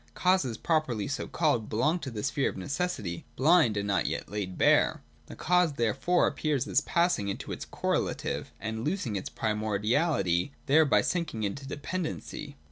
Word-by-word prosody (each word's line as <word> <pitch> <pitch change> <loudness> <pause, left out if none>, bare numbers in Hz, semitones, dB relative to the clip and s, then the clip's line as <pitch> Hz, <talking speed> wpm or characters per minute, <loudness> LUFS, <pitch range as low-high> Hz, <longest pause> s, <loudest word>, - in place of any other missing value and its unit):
Causes, 180 - +2
properly 155 - 0
so 135 - -3
called, 145 -10 0
belong 150 +11 +1
to 140 - -5
the 105 -4 -5
sphere 135 0 +1
of - - -8
necessity, 105 - -3
blind, 145 -6 +4
and 100 0 -1
not 100 -1 +1
yet - - -3
laid 100 -3 -4
bare. - - +3 0.2
The - - -9
cause 180 -3 +2
therefore 135 +8 +2
appears 145 -3 0
as 140 - +3
passing 170 - +1
into 100 - -4
its - - -5
correlative, - - -2
and 110 0 -4
losing 150 - -1
its 95 - -3
primordiality 110 - 0
there 155 +3 +5
by 140 - +4
sinking 170 -11 -2
into 135 +7 -3
dependency. 145 -1 -5
135 Hz, 160 wpm, -29 LUFS, 105-160 Hz, 0.2 s, there